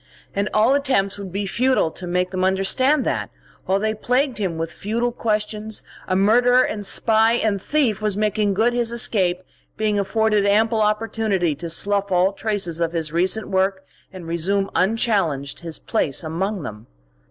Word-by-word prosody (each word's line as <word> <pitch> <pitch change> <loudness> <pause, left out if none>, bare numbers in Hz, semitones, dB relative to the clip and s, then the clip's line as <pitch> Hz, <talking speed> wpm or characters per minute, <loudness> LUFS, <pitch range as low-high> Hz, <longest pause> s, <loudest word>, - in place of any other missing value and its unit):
And 200 +1 -1
all 220 +5 +3
attempts 255 -9 0
would 195 -2 -7
be 200 +2 -3
futile 250 -3 +1
to 180 - -8
make 180 +1 -1
them 185 -1 -2
understand 225 +10 +2
that, - - -2 0.4
while 190 - +2
they 215 +1 0
plagued 250 +2 0
him 185 -5 -2
with 165 0 -3
futile 235 +4 -2
questions, 215 -1 -3 0.2
a 185 - 0
murderer 245 +6 +4
and 210 -4 -3
spy 220 +3 +3
and 215 -4 0
thief 250 -8 0
was 210 -2 0
making 210 -1 0
good 230 +4 +2
his 240 -1 0
escape, 185 -6 +2 0.3
being 215 -1 0
afforded 210 +1 +1
ample 220 +2 +2
opportunity 210 -5 0
to 170 +4 -7
slough 200 +3 0
all 185 +2 +3
traces 195 -6 -2
of 165 0 0
his 160 -2 -3
recent 185 +6 0
work 190 0 0 0.3
and 185 -3 -10
resume 190 +4 -1
unchallenged 185 - 0
his 165 -2 -4
place 160 - 0
among 185 +4 -3
them. 105 -2 -8
200 Hz, 165 wpm, -21 LUFS, 185-220 Hz, 0.4 s, murderer